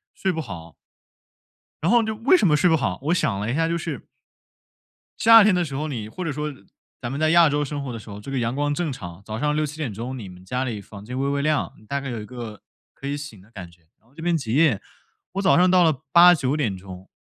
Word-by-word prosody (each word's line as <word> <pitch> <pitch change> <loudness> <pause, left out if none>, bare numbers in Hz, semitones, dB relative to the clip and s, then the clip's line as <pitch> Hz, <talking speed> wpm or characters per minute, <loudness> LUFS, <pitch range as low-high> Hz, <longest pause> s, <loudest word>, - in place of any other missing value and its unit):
睡 190 - 0
不 165 - -4
好。 85 - -9 1.1
然 170 - +2
后 240 -1 +5
就 220 0 -2
为 275 +11 +5
什 200 - +3
么 150 - +4
睡 165 +4 +3
不 160 - +4
好？ 100 -10 -2
我 155 +5 +1
想 130 - 0
了 105 +3 -2
一 - - -1
下 165 +1 +1
就 165 - -1
是 160 -5 -4 1.2
夏 225 -1 +8
天 205 -1 +4
的 180 -1 +2
时 140 -5 -5
候， 150 +3 -2
你 115 -7 -5
或 185 - -6
者 160 - -1
说 150 +2 -3
呃， 150 - -6 0.5
咱 120 -1 -4
们 140 - -4
在 155 0 +3
亚 170 -1 +6
洲 145 0 0
生 145 0 -4
活 135 - -5
的 115 - -6
时 110 - -13
候， 100 0 -8
这 120 +6 -9
个 135 - -1
阳 115 +1 -1
光 145 +1 0
正 160 0 -2
常。 90 -9 -8
早 110 +1 -5
上 150 +2 0
6:00-7:00 135 -5 -3
你 105 -6 -8
们 90 0 -13
家 125 +7 -2
里 110 -5 -4
房 100 0 -12
间 125 +3 -6
微 135 - 0
微 140 0 0
亮， 150 0 0 0.2
大 140 +4 -1
概 135 -1 -6
有 115 -3 -4
一 - - -8
个， 115 -3 -8 0.3
可 140 - -8
以 145 +1 -2
醒 145 -8 -9
的 100 - -21
感 90 -6 -9
觉。 85 0 -24 0.2
然 110 - -32
后 130 - -27
这 160 - -10
边 170 0 +1
极 120 -7 -4
夜， 145 -7 +3 0.5
我 195 - -1
早 185 - +4
上 180 +1 +5
到 185 -1 +5
了 155 -5 +1
8:00-9:00， 130 - +3
140 Hz, 270 characters per minute, -23 LUFS, 110-160 Hz, 1.2 s, 夏